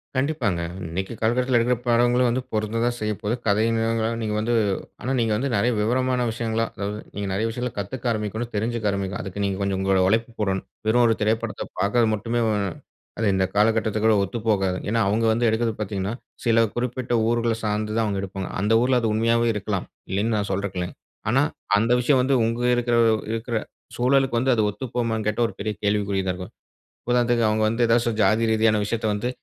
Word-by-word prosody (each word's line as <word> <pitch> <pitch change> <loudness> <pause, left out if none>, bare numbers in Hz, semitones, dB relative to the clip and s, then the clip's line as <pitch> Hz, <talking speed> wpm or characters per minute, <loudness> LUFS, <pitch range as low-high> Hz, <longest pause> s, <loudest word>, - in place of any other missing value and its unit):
கண்டிப்பாங்க. 130 - 0 0.3
இன்னைக்கு 95 +6 -4
காலகட்டத்துல 125 +2 +2
எடுக்குற 125 +1 +2
படங்களும் 120 +1 +3
வந்து, 125 +2 0
பொருந்ததான் 115 +3 0
செய்ய 105 0 -1
போகுது. 110 +3 0
கதையா 110 +3 +3 0.5
நீங்க 105 -1 -2
வந்து 115 +3 0 0.5
ஆனா, 130 - -2
நீங்க 115 -2 +1
வந்து 135 +4 -1
நெறைய 120 +5 +2
விவரமான 125 +2 +1
விஷயங்களா 115 0 -1
அதாவது 105 +1 -4 0.2
நீங்க 100 0 -3
நெறைய 110 +4 0
விஷயங்கள்ல 125 0 -4
கத்துக்க 120 +4 -2
ஆரம்பிக்கணும். 110 +2 -3
தெரிஞ்சிக்க 110 0 -1
ஆரம்பிக்கணும். 100 -1 -3
அதுக்கு 95 +2 -4
நீங்க 100 -1 -1
கொஞ்சம் 100 -1 0
உங்களோட 95 -1 +2
உழைப்பு 115 +4 +1
போடணும். 95 -2 -1 0.2
வெறும் 120 +2 +4
ஒரு 115 -1 +3
திரைப்படத்த 110 +2 -1 0.2
பாக்குறது 110 +3 +2
மட்டுமே 115 +3 -2 0.8
அது 110 - +1
இந்த 95 0 +2
காலகட்டத்துற்கு 110 0 +3
ஒத்துப்போகாது. 100 -3 0
ஏன்னா, 115 +1 +1
அவங்க 110 +3 +1
வந்து 115 +2 +1
எடுப்பது 115 +1 +1
பாத்தீங்கன்னா, 100 -1 -2 0.3
சில 115 -1 +4
குறிப்பிட்ட 125 0 -2
ஊர்கள்ல 115 0 +1
சார்ந்து 105 0 -1
தான் 115 - +2
அவங்க 100 -2 -1
எடுப்பாங்க. 95 -1 -5
அந்த 105 +3 +2
ஊருல 125 +1 +3
அது 115 - 0
உண்மையாகவே 115 +2 +2
இருக்கலாம். 100 -2 -3 0.3
இல்லனு 105 +4 0
நான் 100 -1 -1
சொல்லுறதுக்குல்ல. 95 -2 -2 0.4
ஆனா, 130 +4 +3 0.4
அந்த 115 +3 +1
விஷயம் 130 +2 +3
வந்து 135 +1 +2
உங்க 115 +2 -1
இருக்குற 120 0 +1 0.4
இருக்குற 115 +1 -2 0.4
சூழலுக்கு 130 0 +2
வந்து 130 +2 +2
அது 110 - +2
ஒத்து 130 +6 -6
போகுமானு 115 -3 -1
கேட்டா 105 +2 0
ஒரு - - -9
பெரிய 105 +1 -2
கேள்விக்குறி 100 -1 +1
தான் 90 - +1
இருக்கும். 90 0 -8 0.5
இப்போ 120 -1 +2
அவங்க 110 0 +1
வந்து 115 +2 +1
ஏதாவது 115 0 +2
ஜாதி 110 +4 +3
ரீதியான 110 -1 +3
விஷயத்த 110 +1 -2
வந்து 105 +4 -2
110 Hz, 175 wpm, -24 LUFS, 105-120 Hz, 0.8 s, வெறும்